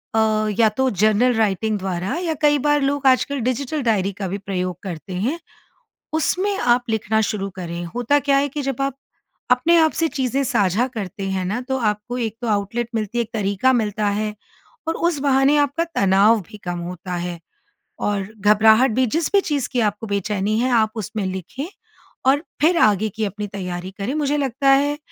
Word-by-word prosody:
अ, - - +4 0.4
या 225 -2 +6
तो 265 0 +2
journal 215 +5 +3
writing 220 0 +1
द्वारा 185 - -3
या 330 -2 0
कई 295 -1 +4
बार 295 +1 +2
लोग 280 0 +1
आजकल 270 +2 +2
डिजिटल 255 +5 -1
डायरी 205 -5 +1
का 195 0 -4
भी 195 - -3
प्रयोग 185 -3 -3
करते 185 0 -6
हैं, 235 - -1 0.8
उसमें 375 +5 +1
आप 240 0 +2
लिखना 220 0 +1
शुरू 200 -2 -2
करें। 175 -1 -5
होता 245 +4 +2
क्या 280 -1 +2
है 285 +1 +1
कि 285 +1 -4
जब 270 -1 -2
आप, 275 -1 -1 0.5
अपने 255 +8 +4
आप 315 -1 +3
से 325 - +3
चीज़ें 270 -1 -1
साझा 215 -1 +1
करते 205 -4 -6
हैं 190 -1 -1
ना 210 +6 -2
तो 265 0 0
आपको 215 +1 -2
एक 225 -3 -3
तो 240 - -2
आउटलेट 215 +3 -1
मिलती 220 +2 -2
है, - - +3
एक 225 - -9
तरीका 205 +4 +2
मिलता 210 -3 0
है, 215 -1 -2 0.5
और 325 - +1
उस 340 -3 0
बहाने 275 +1 +3
आपका 290 +3 +1
तनाव 200 +3 +4
भी 215 - -11
कम 175 -1 -3
होता 180 +1 -6
है। 175 0 -4 0.6
और 200 -2 -1
घबराहट 220 +5 +5
भी, 255 +3 +2
जिस 315 +7 -1
भी 400 - +5
चीज़ 290 -8 -2
की 250 - +1
आपको 210 0 -1
बेचैनी 200 +1 -1
है 255 +1 +1
आप 220 -2 +3
उसमें 215 -1 -3
लिखें 190 - -5 0.6
और 285 +4 +1 0.2
फिर 335 +2 +4
आगे 215 - +3
की 220 +2 -3
अपनी 205 +1 -4
तैयारी 185 -2 -5
करें। 210 +7 -2
मुझे 295 -1 0
लगता 275 0 +1
है, 285 +2 +3
225 Hz, 190 wpm, -21 LUFS, 200-275 Hz, 0.8 s, या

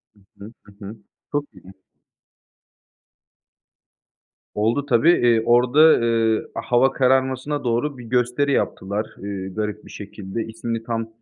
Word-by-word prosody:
Hı - - -24 0.2
hı, 100 +2 -11
hı 105 - -18
hı. 105 +3 -8 0.4
Çok 145 0 -1
iyi. 95 0 -15 2.8
Oldu 115 +7 0
tabii. 145 +3 +3
Eee, 120 -8 +3
orada, 125 +4 +3
ııı, 115 -7 +3
hava 130 +1 +2
kararmasına 130 +2 0
doğru 125 +4 -1
bir 125 - -10
gösteri 125 +4 0
yaptılar, 100 -5 -1
ııı, 95 -1 -6
garip 105 -1 -4
bir - - -13
şekilde. 100 +1 -7
İsmini 115 0 -5
tam 115 -1 -3
115 Hz, 125 wpm, -22 LUFS, 105-130 Hz, 2.8 s, tabii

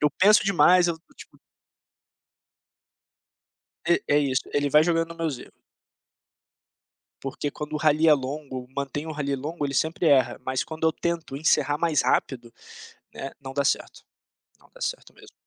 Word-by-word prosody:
eu 150 -1 +3
penso 210 +3 +4
demais, 180 -2 +5
eu 165 -1 -2 0.2
tipo - - -15 2.5
É 170 0 +4 0.2
é - - +6
isso, 135 -3 0
ele 145 0 +1
vai 150 +2 +5
jogando 165 -1 0
nos 170 - -10
meus 160 -6 -2
erro. - - -15 1.6
Porque, 135 +2 -4
quando 150 +1 -7
o - - 0
rally 155 +1 +3
é 155 - +8
longo, 135 -2 -4
mantem 140 +2 -4
o 160 - -4
rally 140 -2 -2
longo, 150 +3 -4
ele 140 - -4
sempre 160 +6 0
erra. 130 -5 +3
Mas, 130 0 -1
quando 160 0 -4
eu - - +3
tento 170 -5 -3
encerrar 145 -1 +1
mais 165 -2 +1
rápido, 120 -3 -1 0.6
né, 135 - -6
não 135 -1 -8
dá 140 +1 -1
certo, - - -1 0.6
não - - -24
dá - - -17
certo - - -4
mesmo. - - -17
150 Hz, 165 wpm, -25 LUFS, 135-165 Hz, 2.5 s, é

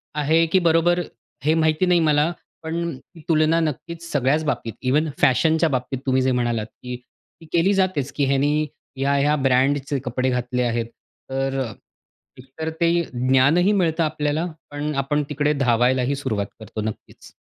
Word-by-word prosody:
आहे 160 +3 +3
की 175 +3 +2
बरोबर, 170 +1 +3 0.5
हे 155 - +4
माहिती 160 +2 +2
नाही 180 -1 +4
मला, 155 +1 +2 0.3
पण 160 +1 -4 0.4
ही 165 - -12
तुलना 160 +1 +3
नक्कीच 165 +2 -4
सगळ्याच 145 +3 +1
बाबतीत. 115 -6 -2
इव्हन 150 +5 +1
फॅशनच्या 160 +5 +3
बाबतीत 130 -1 -2
तुम्ही 130 0 +2
जे 130 0 +2
म्हणालात, 120 -3 0
की 125 +2 -8 0.5
ती - - -12
केली 175 +4 +3
जातेच 185 -8 0
की 145 - +1
ह्यानी 140 +2 +2 0.4
ह्या-ह्या 140 +2 +2
ब्रँडचे 135 +1 +1
कपडे 125 +1 0
घातले 125 0 -1
आहेत. 120 -1 0 0.4
तर 135 0 -1
अ, 115 -4 -3 0.7
एक 130 - -13
तर 160 - -1
ते 170 - +4 0.2
ज्ञानही 135 +9 +3
मिळतं 170 -4 +1
आपल्याला, 150 +1 -1 0.3
पण 150 +1 -3
आपण 145 +2 0
तिकडे 150 0 +1
धावायलाही 125 0 +2
सुरुवात 105 -7 -2
करतो, 110 0 -6
नक्कीच. 110 0 -8
145 Hz, 155 wpm, -22 LUFS, 130-160 Hz, 0.7 s, हे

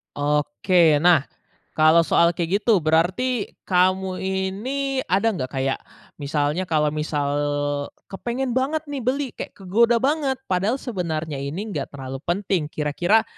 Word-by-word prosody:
Oke. 150 +3 +2
Nah, 170 -5 +5 0.5
kalau 160 +2 +5
soal 170 +1 +3
kayak 180 +4 0
gitu 205 -7 +2
berarti 190 +9 +1 0.2
kamu 185 0 +1
ini 210 +9 -2
ada 200 +5 +2
nggak 130 -9 -3
kayak, 135 0 -2 0.4
misalnya, 145 +5 -1
kalau 150 -2 +2
misal 150 -1 -1 0.8
kepengen 245 +5 -3
banget 280 +5 0
nih 280 - -3
beli 260 +1 -1
kayak - - -8
kegoda 230 +5 +3
banget, 275 +1 +1
padahal 195 +6 0
sebenarnya 165 - -4
ini 180 +10 -4
enggak 150 - -3
terlalu 135 -1 -7
penting, 180 -4 0
kira-kira 175 +9 +1
185 Hz, 130 wpm, -23 LUFS, 155-230 Hz, 0.8 s, Nah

